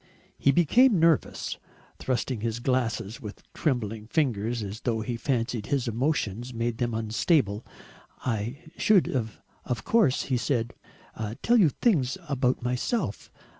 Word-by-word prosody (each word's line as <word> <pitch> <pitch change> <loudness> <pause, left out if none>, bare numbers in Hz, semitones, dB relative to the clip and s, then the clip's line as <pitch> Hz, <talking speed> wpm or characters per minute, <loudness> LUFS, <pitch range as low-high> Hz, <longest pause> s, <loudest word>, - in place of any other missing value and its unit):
He 140 - +4
became 200 - +5
nervous, 165 -2 +1 0.4
thrusting 130 -1 -1
at - - -9
his 115 0 -1
glasses 120 -4 -1
with 105 -2 -9
trembling 110 -7 -1
fingers 120 -5 0
as 100 +2 -6
though 115 -3 -1
he 120 +2 -3
fancied 115 -3 -1
his 135 -3 0
emotions 120 -1 -1
made 115 0 -2
them 120 -2 0
unstable. 110 - +1 0.6
"I 120 +6 -2
should 205 -5 +4
of 115 -1 -4
course," 215 - +3
he 130 - 0
said, 120 -1 -1 0.7
"tell 240 +1 +4
you 175 -7 +6
things 150 - +1
about 130 -4 0
myself. 125 - -2
125 Hz, 130 wpm, -27 LUFS, 115-140 Hz, 0.7 s, you